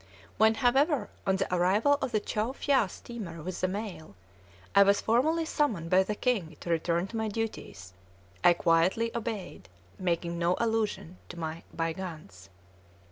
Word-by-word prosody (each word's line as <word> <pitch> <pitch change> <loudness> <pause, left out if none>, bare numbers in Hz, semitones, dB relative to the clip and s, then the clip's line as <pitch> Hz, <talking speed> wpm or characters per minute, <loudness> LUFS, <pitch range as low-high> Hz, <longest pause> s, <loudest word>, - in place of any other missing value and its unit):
When, 220 +1 +5
however, 265 0 +2 0.2
on 190 - +3
the 190 -1 -2
arrival 205 +11 +3
of 250 - -2
the 215 - +2
Chow 215 +4 -2
Phya 270 -7 +2
steamer 185 -11 -8
with 185 +1 -5
the 185 - +2
mail, 190 - -6 0.6
I 200 - +7
was 200 0 +5
formally 310 +9 +2
summoned 225 - -1
by 185 +1 +6
the 210 +2 -2
king 195 - -1
to 170 - -4
return 170 +1 +1
to 230 - -5
my 220 0 -1
duties, 200 - -5 0.5
I 175 - +7
quietly 175 +8 +2
obeyed, 220 - -5 0.3
making 170 -1 -1
no 175 +1 +2
allusion 220 -6 -1
to 175 - -9
my 160 0 -4
"bygones." 160 - -5
190 Hz, 155 wpm, -29 LUFS, 170-225 Hz, 0.6 s, I